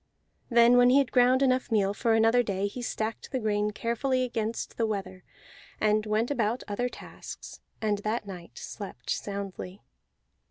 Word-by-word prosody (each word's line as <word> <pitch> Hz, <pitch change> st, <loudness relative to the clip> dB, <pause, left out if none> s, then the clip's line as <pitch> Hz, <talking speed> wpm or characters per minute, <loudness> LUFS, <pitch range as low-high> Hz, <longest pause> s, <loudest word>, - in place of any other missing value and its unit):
Then 235 Hz, 0 st, +6 dB
when 245 Hz, 0 st, +6 dB
he 260 Hz, -, +6 dB
had 275 Hz, -2 st, +2 dB
ground 255 Hz, +1 st, +4 dB
enough 255 Hz, -1 st, +2 dB
meal 200 Hz, -2 st, +2 dB
for 225 Hz, +2 st, +1 dB
another 225 Hz, +2 st, +4 dB
day 200 Hz, -4 st, -1 dB
he 205 Hz, +5 st, -4 dB
stacked 220 Hz, -2 st, -3 dB
the 265 Hz, -, 0 dB
grain 210 Hz, -3 st, 0 dB
carefully 235 Hz, +4 st, 0 dB
against 225 Hz, -2 st, -3 dB
the 230 Hz, -, +1 dB
weather, 195 Hz, -3 st, -4 dB, 0.6 s
and 215 Hz, 0 st, +2 dB
went 220 Hz, +4 st, +1 dB
about 235 Hz, -2 st, 0 dB
other 245 Hz, +4 st, -1 dB
tasks, -, -, -10 dB, 0.2 s
and 210 Hz, -2 st, +1 dB
that 215 Hz, +1 st, -2 dB
night 180 Hz, -4 st, -10 dB
slept 200 Hz, -2 st, -7 dB
soundly. 200 Hz, -1 st, -5 dB
220 Hz, 160 wpm, -28 LUFS, 205-245 Hz, 0.6 s, Then